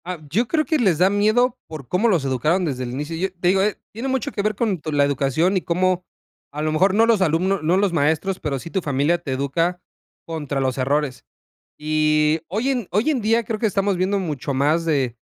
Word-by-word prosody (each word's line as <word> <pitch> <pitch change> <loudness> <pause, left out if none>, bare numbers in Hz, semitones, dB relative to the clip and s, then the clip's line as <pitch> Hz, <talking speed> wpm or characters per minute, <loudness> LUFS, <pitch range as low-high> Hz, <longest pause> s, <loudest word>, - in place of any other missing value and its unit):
Ah, 180 0 -4
yo 225 +8 +1
creo 310 +2 +1
que 310 +3 +1
les 190 -9 +2
da 185 +4 +4
miedo 235 +5 +2
por 155 -5 -9
cómo 185 - +1
los 170 -9 +1
educaron 155 +8 +1
desde 130 -5 -3
el 120 - -5
inicio. 150 +5 -4
Yo 185 +3 -2
te 175 0 +1
digo, 190 +1 +3
eh, 210 +1 0
tiene 230 +5 -5
mucho 265 -3 -1
que - - -2
ver 215 +1 0
con 210 -3 0
con 155 -1 -4
la 145 - +5
educación 145 +6 +1
y - - 0
cómo, 180 +1 0 0.5
a 150 +1 -4
lo 155 - 0
mejor, 185 +5 +2
no 225 +2 +5
los 230 -4 +3
alumnos 185 +3 +1
no 165 +4 +2
los 195 -2 +1
maestros, 160 +5 0
pero 140 -2 -2
sí 165 +6 -9
tu 190 - -1
familia 145 +3 +1
te 155 -5 -6
educa 165 +7 -1 0.5
contra 150 -4 -4
los 130 -1 -1
errores. 140 0 -1 0.6
Y 155 0 +2
hoy 220 +9 -1
en 245 -7 -1
hoy 215 +10 +1
en 275 -6 0
día 225 +2 +2
creo 220 0 -3
que 220 - -1
estamos 200 -2 +1
viendo 190 +2 0
mucho 150 -6 -3
más 150 +5 +1
de 135 -7 0
175 Hz, 230 wpm, -21 LUFS, 150-200 Hz, 0.6 s, la